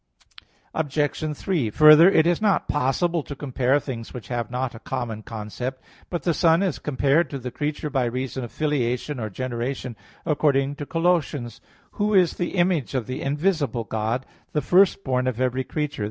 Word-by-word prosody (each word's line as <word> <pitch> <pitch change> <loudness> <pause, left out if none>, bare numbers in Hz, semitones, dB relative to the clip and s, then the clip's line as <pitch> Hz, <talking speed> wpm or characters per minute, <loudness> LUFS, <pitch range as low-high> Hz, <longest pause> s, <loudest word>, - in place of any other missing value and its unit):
Obj. 150 0 -1
3: 160 - 0
Further, 155 - +8
it 160 -5 +4
is 175 +2 +2
not 205 -3 +2
possible 155 +5 +1
to 145 - -8
compare 135 0 +1
things 125 -4 -7
which 125 - -8
have 120 -2 -2
not 125 0 -2
a 115 - -10
common 120 -4 -4
concept. 115 +4 -5 0.3
But 175 - -3
the 170 - +2
Son 165 +3 +3
is 185 -6 -1
compared 150 +3 +1
to 140 - -4
the 125 -1 -6
creature 150 +1 -3
by 130 -3 +1
reason 130 +2 -3
of 120 - -7
filiation 140 -2 -1
or 110 -2 -3
generation, 125 +2 -4 0.3
according 145 -3 +1
to 145 -2 -6
Col. 165 0 -2 0.2
1:15: 120 -6 -7 0.3
"Who 210 0 0
is 180 -3 +4
the 175 +1 -3
image 175 -7 +1
of 125 -4 -1
the 130 - -5
invisible 145 - 0
God, 110 +4 -2 0.3
the 150 - +1
first 195 +1 +4
born 130 -1 0
of 125 -2 -2
every 130 0 0
creature." 150 +1 -3
135 Hz, 180 wpm, -24 LUFS, 125-155 Hz, 0.3 s, Further